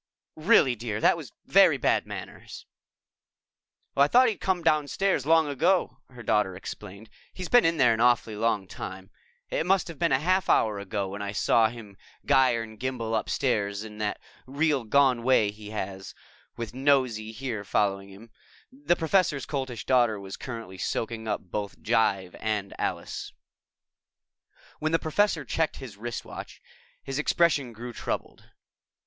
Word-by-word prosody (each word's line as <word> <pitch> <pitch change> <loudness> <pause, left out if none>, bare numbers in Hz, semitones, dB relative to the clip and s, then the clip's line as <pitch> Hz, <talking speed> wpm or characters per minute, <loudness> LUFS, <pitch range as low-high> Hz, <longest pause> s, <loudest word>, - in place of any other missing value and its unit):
"Really, 155 - +4
dear, 110 -2 -4
that - - +4
was - - -9
very - - +5
bad - - +1
manners." - - -9 1.3
"I 140 +1 +5
thought 250 +7 +5
he'd 215 - -5
come 185 -3 0
downstairs 155 0 +1
long 160 -1 +5
ago," 170 +6 +1
her 125 -2 -12
daughter 105 -3 +1
explained. 100 +2 -9 0.3
"He's 185 -1 -6
been 245 0 +6
in 165 0 +2
there 125 -5 +5
an 110 - -3
awfully 120 -2 +3
long 105 -3 0
time. 95 +1 -8 0.4
It - - 0
must 190 +2 +2
have 165 - -9
been 170 -1 +1
a - - +5
half 185 +6 +1
hour 105 -2 +3
ago 100 -1 -3
that 100 +1 -6
I 100 0 -4
saw 110 +2 +3
him 110 -4 -11 0.3
gyre 130 -4 +3
and 110 -1 -12
gimbal 120 -3 -2
upstairs 105 -3 -1
in 105 -1 -10
that 105 -1 -2 0.3
real 140 -2 0
gone 130 0 +3
way 115 -4 +3
he 105 0 -11
has, 95 -2 -6 0.4
with 115 -2 -5
Nosy 130 -5 +1
here 115 -3 -5
following 100 -1 0
him." 105 +4 -14 0.4
The 260 -9 0
Professor's 165 -4 +1
Coltish 130 -5 -4
Daughter 120 -5 +3
was 95 0 -7
currently 115 -7 -8
soaking 115 0 -3
up - - -1
both 100 -1 -4
jive 100 -5 +1
and 105 -3 -2
Alice. - - -4 1.5
When 155 +1 -1
the - - +5
Professor 160 -1 0
checked 160 +5 -1
his 125 -7 -9
wristwatch, 120 +2 -7 0.4
his 135 +1 -4
expression 150 -5 +2
grew 120 +2 -8
troubled. - - -5
120 Hz, 155 wpm, -27 LUFS, 105-145 Hz, 1.5 s, been